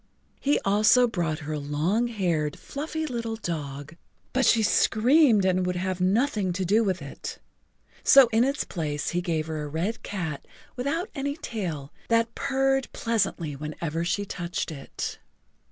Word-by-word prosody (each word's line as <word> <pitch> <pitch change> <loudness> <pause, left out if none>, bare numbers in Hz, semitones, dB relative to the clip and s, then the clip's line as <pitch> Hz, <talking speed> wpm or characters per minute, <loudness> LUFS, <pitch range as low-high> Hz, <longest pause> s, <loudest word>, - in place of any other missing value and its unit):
He 285 +1 +2
also 215 +5 +5
brought 170 -8 -1
her 155 - -3
a 150 - -2
long 155 +11 0
haired, 170 -10 -1
fluffy 315 +2 -4
little 230 -5 -3
dog, 150 -6 -5 0.4
but 260 -2 +3
she 225 -2 +5
screamed 225 +1 +4
and 185 0 +2
would 180 0 -1
have 185 0 -2
nothing 200 -1 +1
to 185 +1 -2
do 210 +6 +3
with 185 -6 -1
it, 140 - -7 0.7
so 275 -2 +8
in 225 +1 +4
its 275 +3 0
place 150 -4 -3
he 175 - -1
gave 165 -3 -1
her 160 -1 -4
a 150 - -4
red 170 +10 -2
cat 160 -8 -5 0.3
without 285 - -2
any 285 0 -3
tail 170 - -5
that 230 0 +2
purred 270 -1 0
pleasantly 195 - -1
whenever 155 +3 -4
she 205 +4 -1
touched 175 -3 -4
it. 140 -3 -6
190 Hz, 155 wpm, -26 LUFS, 160-235 Hz, 0.7 s, so